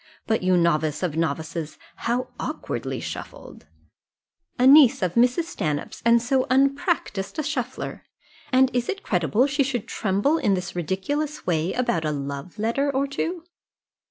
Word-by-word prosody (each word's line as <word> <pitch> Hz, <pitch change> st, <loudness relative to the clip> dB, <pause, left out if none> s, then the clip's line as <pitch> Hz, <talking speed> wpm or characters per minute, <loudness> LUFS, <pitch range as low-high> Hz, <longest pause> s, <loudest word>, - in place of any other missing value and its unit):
But, 220 Hz, -, 0 dB
you 185 Hz, 0 st, +3 dB
novice 155 Hz, -2 st, +1 dB
of 165 Hz, -4 st, -1 dB
novices, 160 Hz, 0 st, -3 dB, 0.2 s
how 245 Hz, +2 st, -1 dB
awkwardly -, -, -4 dB
shuffled! -, -, -8 dB, 0.9 s
A 250 Hz, -, +3 dB
niece 270 Hz, -6 st, +7 dB
of 180 Hz, -2 st, 0 dB
Mrs. 250 Hz, +7 st, +3 dB
Stanhope's, 155 Hz, -, -4 dB
and 235 Hz, 0 st, +5 dB
so 255 Hz, +2 st, +1 dB
unpractised 275 Hz, -, 0 dB
a 310 Hz, -, -1 dB
shuffler! 260 Hz, -4 st, -4 dB, 0.5 s
And 260 Hz, 0 st, +4 dB
is 245 Hz, -1 st, 0 dB
it 390 Hz, -1 st, -3 dB
credible 180 Hz, -, +2 dB
she 280 Hz, +1 st, 0 dB
should 260 Hz, -5 st, -1 dB
tremble 215 Hz, +11 st, +1 dB
in 210 Hz, -9 st, +2 dB
this 180 Hz, -1 st, -5 dB
ridiculous 280 Hz, -, -2 dB
way 165 Hz, 0 st, 0 dB
about 205 Hz, -10 st, 0 dB
a 155 Hz, -, 0 dB
love 140 Hz, +3 st, -5 dB
letter 235 Hz, +7 st, 0 dB
or 275 Hz, +1 st, 0 dB
two?" 325 Hz, +5 st, -3 dB
235 Hz, 150 wpm, -24 LUFS, 175-275 Hz, 0.9 s, niece